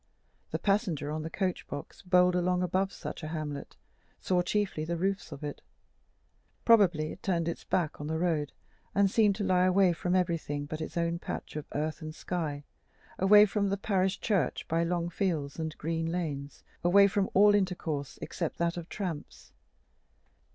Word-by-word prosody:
The - - -2
passenger 195 - 0
on 155 +1 -2
the 160 - -5
coach 185 +1 -2
box, 145 0 -7
bowled 180 -1 +4
along 180 0 +1
above 190 +2 0
such - - -7
a 155 - -5
hamlet, 155 -3 -5 0.4
saw 180 -1 +1
chiefly 190 -3 -1
the 170 +2 -2
roofs 195 0 -1
of 145 0 -8
it: 145 -1 -5 1.0
probably 180 -9 +4
it - - -10
turned 170 -3 0
its 170 - -3
back 155 -5 -1
on 145 - -4
the 160 +1 -1
road, 160 -4 0 0.4
and 200 -1 +4
seemed 210 -3 +4
to 210 - -3
lie 185 -1 +3
away 185 -1 +4
from 180 +2 -1
everything 165 -5 -1
but 155 +1 -5
its 160 - -5
own 170 0 0
patch - - -6
of 150 -1 -5
earth 155 +3 -2
and 155 0 -7
sky, 155 -6 -3 0.6
away 205 +2 +8
from 200 -1 0
the 200 - 0
parish 195 -1 0
church 190 - 0
by 165 +1 +1
long 170 0 0
fields 165 -6 -2
and 160 -1 -4
green 165 +1 -2
lanes, 145 -5 -4 0.2
away 195 +3 +6
from 200 0 +1
all 205 +2 +7
intercourse 175 -8 -1
except 170 -3 -3
that 170 0 0
of 170 0 -6
tramps. 180 -7 -6
175 Hz, 175 wpm, -30 LUFS, 155-190 Hz, 1.0 s, away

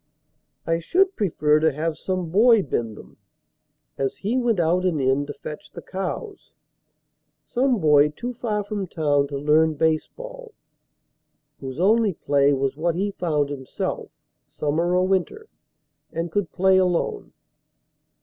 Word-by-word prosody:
I 165 0 0
should 375 - +2
prefer 150 -6 +2
to 160 0 +3
have 155 +3 -2
some 180 0 -3
boy 225 +2 +5
bend 115 -6 -3
them - - -14 0.8
As 135 -1 -1
he 215 +5 -2
went 240 -6 +1
out 170 +2 +2
and 175 -5 0
in 135 +2 +1
to 145 - -5
fetch 150 +1 -9
the - - -10
cows 195 - -6 0.9
Some 255 -1 +1
boy 150 -3 +5
too 240 +11 -6
far 215 -3 -2
from 205 -2 -4
town 145 -4 +1
to 140 0 -5
learn 155 +2 +3
baseball, 460 - -3 1.0
Whose 135 +1 -7
only 210 +2 +3
play 140 -1 +2
was 135 0 0
what 165 +2 -1
he 200 +3 -1
found 150 -7 -1
himself, 135 -2 -4 0.4
Summer 165 +4 -1
or 180 0 +3
winter, 195 - -1 0.7
and 165 0 -4
could 205 -3 -1
play 190 +1 +3
alone. 185 - -1
170 Hz, 140 wpm, -23 LUFS, 150-205 Hz, 1.0 s, boy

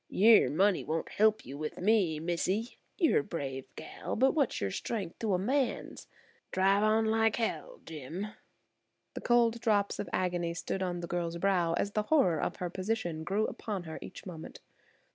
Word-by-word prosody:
"Yer 220 +3 +6
money 195 +4 +2
won't 160 +1 -2
help 215 +1 +2
you 135 - -8
with 155 0 -4
me, 185 -6 +2
missee. 185 +7 -2 0.2
You're 335 -6 +4
a - - -2
brave 135 -4 -5
gal, - - -6
but 265 +3 +3
what's 285 -6 +1
your 100 - -2
strength 195 - -4
to 215 -4 +1
a - - +2
man's? 255 +8 -1 0.4
Drive 195 +2 +3
on 215 +1 +3
like 225 0 +2
h–, 225 - 0 0.2
Jim." 165 +7 -6 0.8
The - - -6
cold 235 -1 +3
drops 205 -3 +1
of 185 - -4
agony 175 -2 -1
stood 190 +2 -3
on 175 -2 -2
the 170 - -5
girl's 170 -1 -2
brow 175 -2 +2
as 200 +4 -1
the 215 - 0
horror 185 - +3
of - - -2
her 180 - -4
position 185 -5 -2
grew 205 +5 0
upon 210 -4 -4
her 160 -2 -7
each - - -10
moment. 165 -4 -8
190 Hz, 180 wpm, -31 LUFS, 170-220 Hz, 0.8 s, Yer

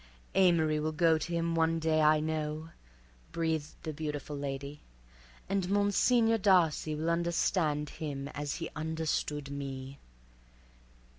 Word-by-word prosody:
"Amory 165 -5 +3
will 155 +1 -1
go 160 0 +3
to 170 - -5
him 170 0 0
one 165 0 +2
day, 160 -1 +2
I 155 0 +5
know," 155 0 -3 0.6
breathed 160 -2 -2
the 155 - -4
beautiful 150 -1 -4
lady, 140 +1 -5 0.7
"and 195 -1 -1
Monsignor 225 +3 +3
Darcy 175 -6 +3
will 160 +2 -1
understand 170 -3 0
him 140 -3 -5
as 145 0 -4
he - - -5
understood 155 -2 -2
me." 135 -1 -6
155 Hz, 125 wpm, -31 LUFS, 150-170 Hz, 0.7 s, I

